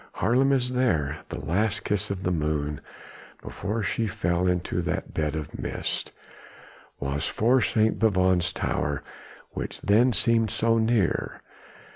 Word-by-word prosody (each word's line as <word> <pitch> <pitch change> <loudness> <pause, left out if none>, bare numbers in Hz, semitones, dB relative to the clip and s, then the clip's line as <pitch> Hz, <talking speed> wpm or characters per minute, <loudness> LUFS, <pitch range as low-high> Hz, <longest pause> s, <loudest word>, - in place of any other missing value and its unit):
Haarlem 130 +3 +2
is 125 -2 +1
there! 80 - +1
the - - -5
last 100 +5 0
kiss 105 -1 -1
of 100 -1 -4
the 90 - 0
moon 75 -3 -1 0.6
before 110 +1 -3
she 110 +3 0
fell 90 -3 0
into 90 0 0
that 85 - -3
bed 75 -1 -1
of 75 -2 -6
mist, - - -3 0.9
was 70 +1 -2
for 120 +4 +3
St. 110 0 +2
Bavon's 95 -4 +3
tower, 75 -5 -2 0.5
which - - -5
then 115 +5 +4
seemed 115 -1 +2
so 115 +2 +2
near. 110 -5 0
100 Hz, 135 wpm, -26 LUFS, 85-115 Hz, 0.9 s, then